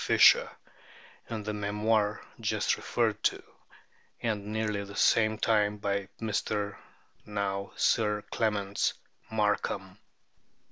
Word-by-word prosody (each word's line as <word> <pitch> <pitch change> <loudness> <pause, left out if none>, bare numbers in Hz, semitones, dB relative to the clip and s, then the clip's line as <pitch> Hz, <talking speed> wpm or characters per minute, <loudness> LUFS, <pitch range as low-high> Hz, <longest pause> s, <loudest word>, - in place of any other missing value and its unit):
Fischer - - +6 0.8
in 110 -2 -4
the 105 +1 -3
memoir 105 +1 +1 0.2
just - - +1
referred - - 0
to, - - 0 0.8
and 110 -3 -1
at 100 - -11
nearly 105 -1 -1
the 100 0 -10
same 110 -1 +3
time 105 -1 +2
by 100 -1 -2
Mr. 105 -1 -1 0.5
(now 100 -1 -3
Sir 105 -2 +2
Clements) 100 -3 0 0.3
Markham. 105 -2 -1
105 Hz, 105 wpm, -29 LUFS, 100-110 Hz, 0.8 s, Fischer